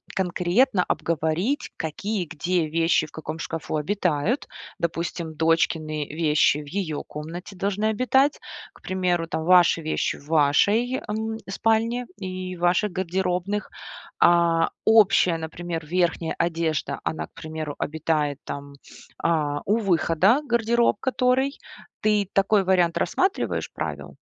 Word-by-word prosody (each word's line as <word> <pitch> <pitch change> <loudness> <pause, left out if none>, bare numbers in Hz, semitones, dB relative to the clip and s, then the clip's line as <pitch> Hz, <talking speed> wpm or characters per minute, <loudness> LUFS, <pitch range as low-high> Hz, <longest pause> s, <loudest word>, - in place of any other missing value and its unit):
конкретно 185 +3 +2
обговорить, 170 - -1
какие, 190 +5 -3
где 175 +1 -1
вещи 165 0 +2
в - - -19
каком 160 +1 -6
шкафу 165 -1 -4
обитают? 180 - 0 0.3
Допустим, 170 -1 -3
дочкины 155 -1 0
вещи 155 -2 +3
в 150 - -9
ее 160 -3 -3
комнате 170 +6 -8
должны 200 +3 -1
обитать. 255 +6 +2 0.3
К - - -20
примеру, 180 -3 -1
там 160 - -3
ваши 175 -1 +5
вещи 155 0 -1
в 145 - -17
вашей, 200 - +3
эм, 220 +1 -3
спальне 225 +4 +1
и 185 -1 -5
ваших 175 +4 +2
гардеробных. 185 +2 -2 0.5
А 170 -1 +4 0.2
общая, 205 -6 +5
например, 165 0 -5
верхняя 170 0 0
одежда, 165 -3 -1
она, 160 - -3
к - - -42
примеру, 155 -2 -6
обитает, 150 -2 -1
там, 140 0 -7 0.4
а, 150 -3 0
у 210 +3 +2
выхода 190 - +3
гардероб, 235 -1 +2
который. 260 +1 +1 0.4
Ты 210 -2 +2
такой 200 +1 +3
вариант 180 -3 +2
рассматриваешь 375 - 0
правил? - - -5
175 Hz, 120 wpm, -24 LUFS, 160-205 Hz, 0.5 s, ваши